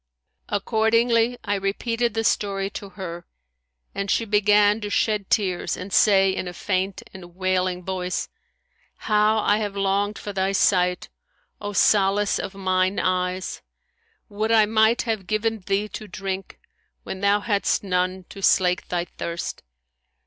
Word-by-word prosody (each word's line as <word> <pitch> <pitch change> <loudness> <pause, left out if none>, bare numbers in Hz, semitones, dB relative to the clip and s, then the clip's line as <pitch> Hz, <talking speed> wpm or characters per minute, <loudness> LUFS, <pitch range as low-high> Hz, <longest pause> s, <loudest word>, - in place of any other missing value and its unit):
Accordingly, 230 +3 +2
I 205 - -1
repeated 225 +4 -1
the 225 - 0
story 195 -2 0
to 200 - -7
her, 175 -4 -8 0.7
and 200 0 -3
she 230 - +1
began 210 0 +3
to 205 - -4
shed 210 -1 0
tears 185 -4 0
and 185 +2 -7
say 195 -2 +5
in 185 - -3
a 175 - -6
faint 190 +1 -2
and 175 -2 -12
wailing 185 -1 -1
voice, 180 -1 -2 0.7
How 215 0 +2
I 210 -1 +2
have 205 -2 -3
longed 200 +1 0
for 205 - -6
thy 190 0 0
sight, 180 -2 +2 0.5
O 205 0 -4
solace 200 0 +3
of 195 -1 -5
mine 185 0 0
eyes![FN#166] 185 - -5
Would 220 +1 0
I 220 -2 +6
might 220 +2 +3
have 220 -5 -3
given 220 +1 0
thee 200 +1 0
to 215 - -8
drink, 195 -1 -6 0.4
when 190 - -6
thou 200 +1 +3
hadst 205 -1 0
none 185 0 -1
to 195 - -10
slake 180 -2 +2
thy 175 -1 -2
thirst! 170 0 -5
200 Hz, 145 wpm, -23 LUFS, 185-215 Hz, 0.7 s, I